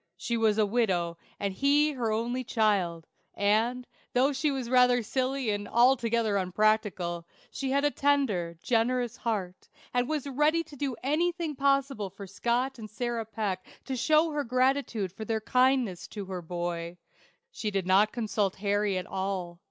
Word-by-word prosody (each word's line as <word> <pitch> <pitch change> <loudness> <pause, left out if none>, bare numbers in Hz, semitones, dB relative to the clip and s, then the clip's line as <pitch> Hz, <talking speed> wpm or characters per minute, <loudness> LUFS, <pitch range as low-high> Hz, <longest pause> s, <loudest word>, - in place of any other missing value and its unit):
She 235 - -2
was 220 -2 +2
a 215 - +4
widow, 185 -7 0 0.2
and 200 -1 -2
he 285 +7 +3
her 240 -6 -2
only 240 +4 -1
child; 195 -8 +1 0.3
and, 225 +5 +1 0.3
though 265 +3 +3
she 275 +3 0
was 265 -4 -2
rather 250 -1 +4
silly 260 0 -1
and 205 0 -3
altogether 235 -3 +3
unpractical, 185 -3 0 0.2
she 270 - -3
had 280 +2 +2
a 290 - +3
tender, 225 - +1
generous 240 0 +1
heart, 195 -6 -4 0.2
and 245 0 +1
was 305 -3 -1
ready 300 +4 +2
to 295 - -14
do 275 -2 -2
anything 330 +2 0
possible 275 -6 +1
for 195 +2 -10
Scott 240 +6 -1
and 215 -1 -8
Sarah 235 +1 -3
Peck 205 -4 -3 0.2
to 265 - -3
show 310 +5 +3
her 295 -1 -1
gratitude 255 -5 0
for 220 - -8
their 220 0 -1
kindness 250 -5 +1
to 205 -2 -7
her 185 -1 -5
boy. 175 0 -4 0.5
She 220 - -3
did 195 -3 -1
not 195 +3 +4
consult 210 -4 -1
Harry 205 0 0
at 180 - -3
all. 190 -2 -4
230 Hz, 160 wpm, -28 LUFS, 195-265 Hz, 0.5 s, a